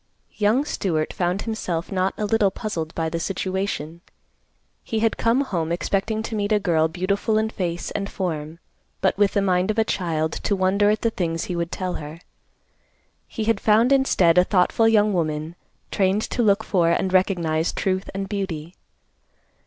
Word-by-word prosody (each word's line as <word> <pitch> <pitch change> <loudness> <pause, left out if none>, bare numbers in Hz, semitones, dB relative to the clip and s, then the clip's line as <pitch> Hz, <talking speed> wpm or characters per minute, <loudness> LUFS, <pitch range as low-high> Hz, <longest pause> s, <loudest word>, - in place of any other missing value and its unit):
Young 220 +7 +2
Stewart 160 - -1
found 180 +2 -1
himself 185 -7 -3
not 190 0 0
a 210 - -1
little 210 -1 +3
puzzled 175 -6 -5
by 165 -1 -1
the 165 +1 -3
situation. 185 -3 -3 0.8
He 225 - -3
had 225 -1 +2
come 230 +4 +2
home 170 - -2
expecting 195 +5 -1
to 225 - -6
meet 205 -1 -1
a 210 - +4
girl 165 -5 +2
beautiful 200 +6 0
in 220 0 0
face 175 -4 -3
and 200 0 -3
form, 160 -4 -4 0.4
but 190 - +2
with 205 0 +2
the 200 - +2
mind 185 0 +1
of 215 - -1
a 225 - +4
child 165 -6 -1
to 200 - -1
wonder 195 +2 +2
at 215 0 +1
the 230 - +2
things 165 -5 -2
he 180 - -4
would 170 0 -2
tell 185 -1 -3
her. 150 +2 -8 1.1
He 225 - -4
had 225 -2 +1
found, 225 +5 +3
instead, 185 -11 +4
a - - +6
thoughtful 190 +4 +2
young 210 -2 +4
woman 155 -1 -2 0.4
trained 195 +2 +1
to 245 - 0
look 210 -1 +3
for 175 -6 +2
and 185 +2 0
recognize 170 -4 +1
truth 190 0 -2
and 195 0 -4
beauty. 185 -5 -4
190 Hz, 175 wpm, -23 LUFS, 170-210 Hz, 1.1 s, a